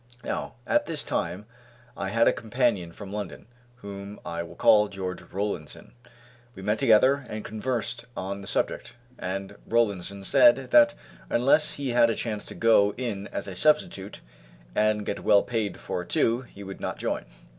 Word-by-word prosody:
Now, - - -4
at 295 0 +2
this 150 -3 -2
time 90 +5 -2 0.5
I 95 - -3
had 115 +3 +3
a - - +5
companion 115 -6 0
from 100 +2 -9
London, 105 -1 -5 0.3
whom 100 -3 -8
I 85 0 -3
will 85 - -9
call 105 -1 +5
George 95 -2 -5
Rollinson. 95 -5 -5 0.6
We 95 - -9
met 105 +2 0
together 130 +3 +5
and 110 0 -5
conversed 115 +2 -3
on 100 +1 -4
the 95 - -10
subject, - - -2 0.2
and 95 +2 -4
Rollinson 100 -4 0
said 300 - +5
that 295 -1 +6 0.3
unless 140 +5 +3
he 140 -2 -3
had 120 -1 +4
a 115 - 0
chance 110 -3 -4
to - - -8
go 105 -3 +4
in 105 -5 -3
as - - -5
a 95 - -6
substitute, 105 - +1 0.5
and 105 - +2
get - - -3
well 100 -1 +4
paid 115 -4 -2
for 90 - -3
it 90 - -11
too, 115 +2 +2
he 100 -5 -12
would 95 0 -8
not - - -3
join. - - -2
105 Hz, 170 wpm, -27 LUFS, 100-120 Hz, 0.6 s, that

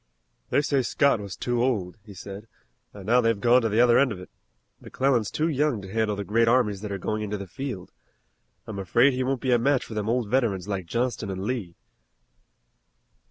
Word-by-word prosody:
"They 145 - +2
say 140 -2 +1
Scott 140 0 +2
was 100 -3 -7
too 120 -1 -1
old," 100 -9 -1
he 105 -2 -13
said, 100 +3 -9 0.4
"and 100 -2 -11
now 120 +4 +4
they've 115 -3 +1
gone 120 +3 +4
to 115 - 0
the 110 +2 +1
other 120 -1 +5
end 140 -3 +3
of 100 - -6
it. 90 - -12 0.5
McClellan's 130 -6 0
too 155 - -1
young 150 -6 0
to 95 +1 -9
handle 110 -2 0
the 100 - -4
great 115 +3 +2
armies 115 -5 +2
that 105 -1 -5
are 100 - -2
going 105 +3 -3
into 105 0 -3
the 100 - -7
field. 95 0 -6 0.7
I'm 105 -3 -6
afraid 120 +9 +3
he 130 - -2
won't 130 -1 -1
be 130 - 0
a 120 - +4
match 135 +2 +1
for - - -9
them 105 0 -2
old 120 -1 0
veterans 105 -6 0
like 95 -4 -3
Johnston 120 +1 -2
and 95 0 -4
Lee." 105 -7 -3
115 Hz, 210 wpm, -25 LUFS, 100-125 Hz, 0.7 s, other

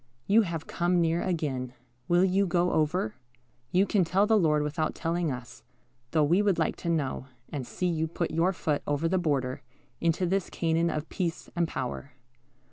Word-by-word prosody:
You 215 +3 +5
have 170 -6 -3
come 175 +1 +1
near 165 0 +2
again. 135 -8 -2 0.3
Will 175 +1 +4
you 190 +1 +2
go 175 0 +2
over? 155 - +1 0.6
You 185 +7 +3
can 200 -2 +2
tell 190 +4 +2
the 220 +1 +3
Lord 155 -7 +3
without 155 +1 -1
telling 170 -1 -1
us, 125 -2 -8 0.5
though 155 +1 +3
we 170 +7 +4
would 200 -3 +2
like - - +1
to 170 - -4
know, 140 -5 -1 0.2
and 135 -5 -5
see 180 - -3
you 160 -2 0
put 170 +1 -3
your 165 +4 +2
foot 155 -5 -1
over 145 +3 +1
the 185 +2 +1
border, 140 -6 -1 0.4
into 170 +2 +1
this 190 +1 0
Canaan 165 0 +1
of 155 -1 -3
peace 175 -3 -3
and 170 -1 +1
power. 135 -1 -5
165 Hz, 185 wpm, -28 LUFS, 150-180 Hz, 0.6 s, You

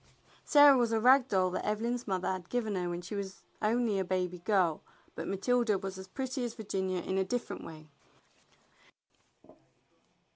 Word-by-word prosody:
Sarah 290 -2 +7
was 240 -3 +2
a 225 - +2
rag 255 +3 +5
doll 185 -4 +1
that - - -3
Evelyn's 230 +4 -2
mother 190 -2 -1
had 185 -2 -6
given 230 -4 -1
her 180 -2 -2
when 175 0 -4
she 180 - -8
was 200 -1 -6 0.2
only 220 -1 +1
a - - +1
baby 180 -1 -2
girl, 175 -4 +1 0.3
but 165 - -6
Matilda 220 +2 +1
was 190 0 -6
as 190 - -9
pretty 260 +4 -4
as 235 -1 -4
Virginia 190 -5 -2
in 190 +1 -1
a - - +2
different 245 +5 -4
way. 155 -1 -11
200 Hz, 170 wpm, -31 LUFS, 185-240 Hz, 0.3 s, Sarah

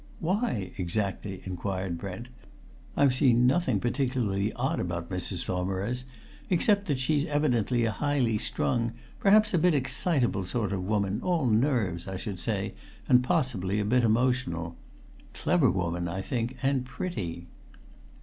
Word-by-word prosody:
"Why, 170 - -1
exactly?" 95 +1 -2
inquired 95 -1 -3
Brent. 100 +5 -6 0.7
"I've 140 -2 +5
seen 125 -3 +4
nothing 130 - +2
particularly 120 -5 0
odd 135 +7 -1
about 85 0 -3
Mrs. 90 -1 -2
Saumarez, 95 +7 -2 0.4
except 200 +3 +3
that 145 -4 +1
she's 145 +3 +1
evidently 125 -6 +1
a 115 - +1
highly 125 -3 +1
strung, 115 0 0 0.3
perhaps 215 +1 +5
a 175 - +4
bit 175 0 +4
excitable 130 - +1
sort 105 0 -1
of 95 -2 -2
woman, 100 -1 0
all 175 -5 +1
nerves, 110 - +1
I 95 0 -4
should 95 -2 -5
say, - - -2 0.3
and 125 0 +5
possibly 105 -7 0
a 105 - 0
bit 125 +3 +3
emotional. 110 -8 +1 0.6
Clever 165 -8 +3
woman, 85 -1 -1
I 95 +3 -3
think, 120 +4 -2
and 135 -1 +2
pretty." 100 - -5
115 Hz, 140 wpm, -28 LUFS, 95-135 Hz, 0.7 s, I've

